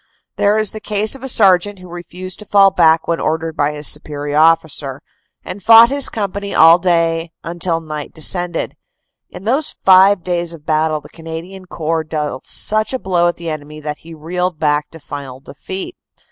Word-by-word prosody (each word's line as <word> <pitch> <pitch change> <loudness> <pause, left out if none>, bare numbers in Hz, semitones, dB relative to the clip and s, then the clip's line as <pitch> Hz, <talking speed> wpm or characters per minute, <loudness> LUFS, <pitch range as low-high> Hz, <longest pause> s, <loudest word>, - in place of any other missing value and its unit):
There 205 +1 +2
is 215 -2 0
the 215 - -8
case 210 0 +1
of 270 - -4
a 265 - -5
sergeant 200 -4 +3
who 185 0 -13
refused 180 +1 -8
to 210 - -9
fall 195 -1 +5
back 165 -3 +3
when 170 0 -1
ordered 160 0 -2
by 145 +1 0
his 150 0 -3
superior 145 -1 -3
officer, 155 -4 +1 0.5
and 200 - -7
fought 230 +4 +7
his 280 -1 0
company 200 -1 -4
all 165 +2 +7
day 165 -2 0
until 170 0 -2
night 155 -2 -7
descended. 175 +1 -2 0.5
In - - -11
those 270 +8 0
five 190 0 +6
days 175 -1 -2
of 150 -2 -18
battle 155 0 0
the - - -15
Cana 165 0 -8
dian 190 +1 -12
Corps 160 -1 -2
dealt 150 -4 -4
such 215 +3 +1
a - - 0
blow 175 -4 +1
at 175 - -2
the 170 -1 -5
enemy 150 0 -8
that 150 0 -6
he 165 0 -12
reeled 180 +2 -3
back 150 -1 0
to 165 - -13
final 140 -3 -8
defeat. 190 - -7
170 Hz, 190 wpm, -17 LUFS, 155-190 Hz, 0.5 s, fought